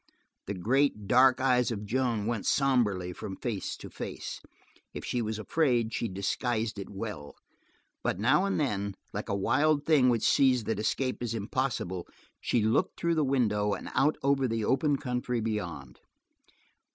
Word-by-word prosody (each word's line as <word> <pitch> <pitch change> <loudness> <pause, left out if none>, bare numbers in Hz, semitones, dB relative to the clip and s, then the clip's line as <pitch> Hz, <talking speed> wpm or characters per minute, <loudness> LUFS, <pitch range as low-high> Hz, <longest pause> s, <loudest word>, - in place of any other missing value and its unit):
The 100 - -3
great, 115 +3 +1
dark 130 +3 +5
eyes 125 -2 +3
of 105 -3 -4
Joan 115 -2 0
went 115 -3 -2
somberly 105 -10 +2
from 95 +2 -6
face 110 -3 -4
to - - -9
face. - - -6 0.5
If - - -5
she 120 - -1
was 110 -1 -2
afraid, 120 -2 +1
she 115 - -1
disguised 110 +3 -2
it 100 - -7
well, 95 -8 -6 0.7
but - - 0
now 130 - +3
and 195 - 0
then, 100 -9 -1 0.2
like - - -4
a 100 - 0
wild 145 +8 +2
thing 145 -6 +5
which 115 -3 +2
sees 130 -4 +4
that 110 -1 -2
escape 130 +4 -1
is 115 -2 -2
impossible, 105 -5 -2 0.3
she 115 - +1
looked 110 - +1
through 170 0 +1
the 155 -2 +2
window 105 -7 +1
and - - -8
out 150 +3 +2
over 135 -1 +2
the 115 -2 -1
open 140 +3 +2
country 125 -2 -2
beyond. 90 - -4
115 Hz, 165 wpm, -29 LUFS, 105-130 Hz, 0.7 s, dark